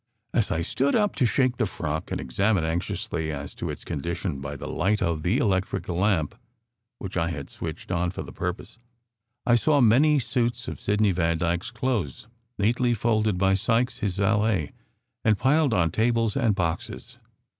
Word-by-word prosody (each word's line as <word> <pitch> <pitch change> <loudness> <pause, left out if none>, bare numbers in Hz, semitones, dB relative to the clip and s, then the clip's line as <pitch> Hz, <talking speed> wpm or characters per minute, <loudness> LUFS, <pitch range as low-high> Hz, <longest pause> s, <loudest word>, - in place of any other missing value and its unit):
As - - +1
I 85 - 0
stood 135 +10 +1
up 210 -2 +2
to 130 -4 +3
shake 125 +1 +1
the 110 - +1
frock, 80 -3 -4
and - - -1
examine 95 - +1
anxiously 80 -1 -2
as 70 -1 -6
to - - -5
its - - -6
condition 85 +1 -3
by 70 +1 -5
the - - -7
light 100 +4 +1
of 85 -4 0
the 90 +9 +1
electric 95 -5 0
lamp, 90 -3 +1 0.6
which - - -7
I 85 0 +1
had 70 -4 -6
switched - - -6
on 90 0 +1
for 95 - -5
the - - -10
purpose, 90 +5 -5 0.7
I 120 - +4
saw 145 +5 +4
many 135 +6 +5
suits 120 -1 -1
of - - -6
Sidney 105 0 +2
Vandyke 85 0 0
s - - -4
clothes 115 - -2 0.3
neatly 120 +4 +2
folded 110 -3 +1
by 95 +1 +3
Sykes, 115 +5 +1
his 100 -3 -1
valet, 105 -4 +1 0.5
and 110 -2 +3
piled 145 +3 +3
on 85 -6 +2
tables 115 - +1
and 115 -7 +2
boxes. 85 -3 -3
100 Hz, 175 wpm, -26 LUFS, 85-120 Hz, 0.7 s, many